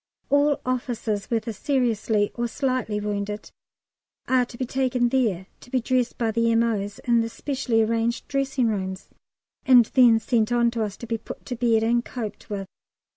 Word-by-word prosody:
All 285 0 +3
officers, 240 -5 -2
whether 230 -1 -1
seriously 220 -4 0
or 240 0 -2
slightly 255 -4 -1
wounded, 210 0 -4 0.8
are 255 -1 +3
to 235 - -12
be 255 - -2
taken 250 -1 +1
there 220 -8 0
to - - -16
be 255 - +1
dressed 250 0 0
by 230 -3 0
the 230 +1 +2
M.O.'s 220 -3 0
in 235 -2 +3
the 230 - -2
specially 245 -3 0
arranged 230 +2 -1
dressing 270 -2 0
rooms, 190 -3 -3 0.5
and 250 -3 +7
then 240 -4 +6
sent 225 -1 +1
on 235 -1 +3
to 230 -1 -3
us 205 -2 -5
to - - -8
be 230 -1 -2
put - - -10
to 250 - -4
bed 230 -2 +2
and 235 +1 +2
coped 225 -5 -7
with. 200 -2 -4
235 Hz, 175 wpm, -24 LUFS, 220-250 Hz, 0.8 s, and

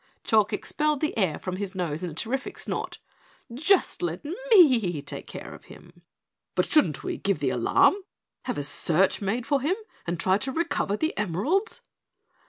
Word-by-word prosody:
Chalk 215 -1 +3
expelled 300 +7 0
the 305 - -1
air 185 -8 +1
from 185 -1 -5
his 195 -1 -5
nose 170 -2 -2
in 180 - -2
a - - -9
terrific 260 +9 -3
snort. - - -4 0.6
"Just 335 +9 +2
let 175 - -3 0.2
me 250 - +5
take 140 - -7
care - - -8
of - - -14
him." - - -16 0.5
"But - - +2
shouldn't 165 - +2
we - - -3
give 200 -1 0
the 140 -3 0
alarm, 125 - +4 0.5
have 250 - -2
a 145 - -2
search 170 +7 +1
made 220 +5 -1
for 280 -2 +1
him, 315 +8 +1 0.3
and 170 -1 -2
try 190 +2 +2
to 265 +2 -2
recover 295 -10 -1
the 315 +5 -1
emeralds?" 230 - 0
205 Hz, 175 wpm, -26 LUFS, 175-285 Hz, 0.6 s, me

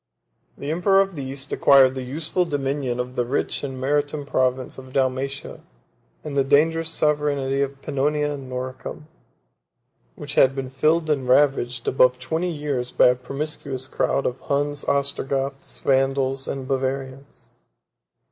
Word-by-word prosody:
6 - - -19
The 145 - -3
emperor 185 +4 +3
of 195 0 +1
the 140 - -4
East 135 +1 -5
acquired 135 -2 +6
the 130 - -4
useful 155 +7 -1
dominion 140 -5 -2
of 125 +1 -4
the 125 - +1
rich 125 +4 -1
and 135 -2 -5
maritime 145 +2 0
province 130 -1 0
of 130 0 -12
Dalmatia, 135 +1 -1 0.6
and 150 -2 -5
the 140 - +3
dangerous 160 +4 +2
sovereignty 145 -3 +1
of 140 0 -3
Pannonia 150 +1 0
and 135 -3 -7
Noricum, 130 +3 -6 1.1
which - - -6
had 135 0 +4
been 130 -1 -4
filled 155 +5 +2
and 135 -4 -1
ravaged 125 -3 +2
above 125 -1 +4
twenty 160 +8 -2
years 145 -6 -3
by - - +5
a 125 - +3
promiscuous 135 0 -5
crowd 135 0 0
of 125 - -2
Huns, 145 0 -1
Ostrogoths, 140 -1 -2
Vandals, 135 0 +1
and 135 -1 -4
Bavarians. 135 +1 -4
135 Hz, 145 wpm, -23 LUFS, 130-145 Hz, 1.1 s, acquired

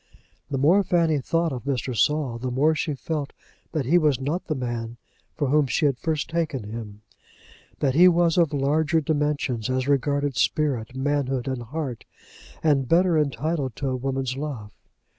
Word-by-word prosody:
The 140 - -2
more 165 +9 +4
Fanny 170 -4 +2
thought 165 +3 0
of 125 -1 -6
Mr. 130 -2 -2
Saul, 140 -2 +1
the 130 +1 -3
more 140 +6 +2
she 155 -1 -2
felt 150 0 -4 0.4
that 155 -5 -1
he 170 +8 +4
was 150 -6 +2
not 150 +7 -2
the 155 - -1
man 120 -2 -4 0.4
for 145 -2 -1
which 145 0 +2
she 155 - +1
had 135 -3 +1
first 155 -3 -1
taken 160 -7 -2
him, 105 -1 -8 0.8
that 135 -3 +2
he 175 +6 +7
was 170 -2 +3
of 170 -4 +3
larger 150 +3 +1
dimensions 145 -6 -1
as 130 0 -1
regarded 140 0 +1
spirit, 130 -4 0
manhood, 135 -2 -1
and 130 -2 -2
heart, 130 0 -5 0.6
and 140 -5 +2
better 175 0 +4
entitled 150 -2 -1
to 140 - -2
a 130 - -1
woman's 130 0 -2
love. 135 -8 -5
140 Hz, 170 wpm, -24 LUFS, 130-155 Hz, 0.8 s, he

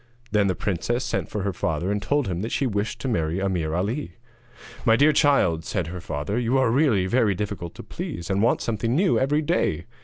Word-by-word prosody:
Then 105 -2 +3
the 95 - 0
princess 120 +8 -1
sent - - -2
for 105 -2 -3
her 100 -1 -1
father 85 +2 -1
and 105 0 -1
told 140 +5 0
him 90 -1 -2
that 110 - -4
she 140 - 0
wished 105 -2 -2
to - - -3
marry 85 -6 0
Ameer 90 -5 -1
Ali. 110 +11 -2 0.7
'My 115 -2 +5
dear 145 +5 +5
child,' 90 - +3
said 95 -1 -2
her 90 +2 -6
father, 75 +8 -3
'you 125 +2 +1
really 120 -5 +3
are - - -3
very 110 -4 +2
difficult 100 -3 -5
to - - -9
please, 85 0 -6
and 95 +1 0
want 115 - +2
something 115 +2 -1
new 180 +4 +3
every 145 +3 +1
day. 90 - 0
105 Hz, 215 wpm, -24 LUFS, 90-125 Hz, 0.7 s, My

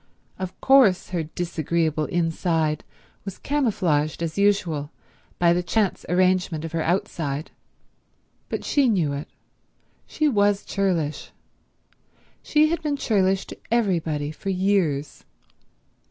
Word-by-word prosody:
Of 185 -1 -6
course 245 -9 +5
her 175 -2 -1
disagreeable 160 -1 -1
inside 165 -2 0 0.4
was 195 -2 -7
camouflaged 180 - 0
as 160 -1 -3
usual 185 -8 +1 0.5
by 170 -1 +4
the 175 - +1
chance 200 +2 -1
arrangement 180 -3 +1
of 165 - -6
her 165 -1 -1
outside; 160 -4 -2 1.0
but - - -3
she 280 -4 +3
knew 170 -9 +1
it. 140 +2 -5 0.8
She 310 - 0
was 205 -5 +2
churlish. 175 -7 -1 1.1
She 305 0 +3
had 335 -1 -1
been 295 -2 -1
churlish 195 -7 +1
to - - -10
everybody 170 -10 0
for 195 +5 -6
years. 180 -7 0
180 Hz, 115 wpm, -24 LUFS, 160-200 Hz, 1.1 s, course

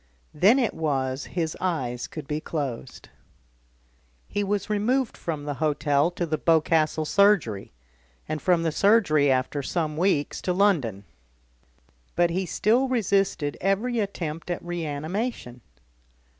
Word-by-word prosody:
Then 200 - +5
it 245 -6 +1
was 135 -4 -2
his 165 -3 -3
eyes 130 -10 -2
could 155 -3 -8
be 150 0 -2
closed. 135 -7 -5 1.2
He 205 - -2
was 200 0 -1
removed 225 +5 0
from 155 -4 -4
the 145 - -2
hotel 150 0 +2
to 175 0 -3
the 155 -1 -2
Boscastle 160 -1 +2
surgery, 180 - +2 0.6
and 155 0 -3
from 175 -2 +2
the 165 - +1
surgery, 170 -7 +3
after 130 +2 0
some 155 +1 -2
weeks, 170 -5 0
to 180 - -1
London. 155 - +1 1.1
But 175 -1 +3
he 185 +2 -1
still 235 +10 +2
resisted 195 - 0
every 215 +6 0
attempt 170 -6 -4
at 175 -1 -3
reanimation. 165 - -4
165 Hz, 130 wpm, -25 LUFS, 145-200 Hz, 1.2 s, Then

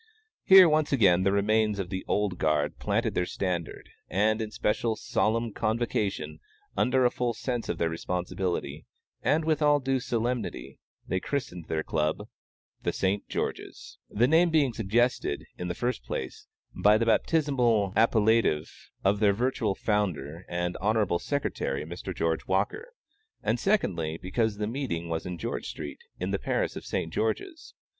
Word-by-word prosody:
Here, 190 -2 +9
once 155 -1 +2
again, 95 -10 +4
the 95 +1 +2
remains 105 +1 +2
of 95 -2 -4
the 95 -1 -3
"old 100 -3 0
guard" 75 -2 +1
planted - - 0
their 90 - 0
standard, 90 -4 -3 0.2
and 110 +4 +2
in 110 - -3
special, 110 +1 0
solemn 115 +1 0
convocation, 110 -2 -1 0.4
under 130 0 +3
a 120 - +4
full 120 -2 -1
sense 120 -1 -3
of - - -1
their 80 -1 0
responsibility, 85 -3 -3 0.3
and 155 +1 +2
with 160 -1 +1
all 145 -1 +4
due 135 -1 0
solemnity, 120 - -3 0.3
they 95 - 0
christened 90 - -4
their 80 -1 -1
Club 75 0 -1 0.5
THE - - 0
ST. 100 +2 -1
GEORGE'S, - - -5
the 120 +4 +2
name 165 +4 +4
being 150 -6 +2
suggested, 115 - 0
in 90 - -3
the 90 - -3
first 125 +1 -2
place, 65 - -5 0.3
by 105 +1 +4
the 115 - 0
baptismal 120 - +2
appellative 110 -7 +3 0.3
of 100 +1 +2
their 105 -2 +4
virtual 115 -2 0
founder 90 -6 -2
and 90 0 -2
Hon. 105 -4 +1
Sec., 145 +7 -2
Mr. 85 +6 -4
George 80 -1 -1
Walker; 105 - -1 0.5
and, - - +1
secondly, 85 - 0
because 105 +4 -1
the 105 - -1
meeting 105 -9 -3
was 80 +1 -3
in 90 -1 -4
George 115 +6 -4
street, - - -7 0.2
in - - -2
the - - 0
parish - - -1
of - - -7
St. - - -2
George's. 375 -5 -3
105 Hz, 155 wpm, -28 LUFS, 90-125 Hz, 0.5 s, Here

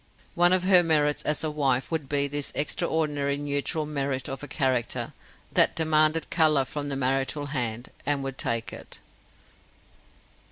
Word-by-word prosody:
One 175 +1 +4
of 185 -1 +3
her 185 -1 +6
merits 150 -3 +2
as 150 0 0
a 155 - -1
wife 135 -3 0
would 155 -4 -3
be 140 -1 +1
this 145 0 -2
extraordinary 145 -1 0
neutral 145 +2 -2
merit 140 -3 -2
of 135 -1 -6
a 145 - -6
character 130 -6 -1 0.4
that - - +3
demanded 155 0 +2
colour 155 -5 +3
from 145 +2 -5
the 140 - -2
marital 135 +2 0
hand, 120 -2 -3
and 145 -1 0
would 135 -1 -6
take 115 -1 -2
it. - - -8
145 Hz, 155 wpm, -26 LUFS, 135-155 Hz, 0.4 s, her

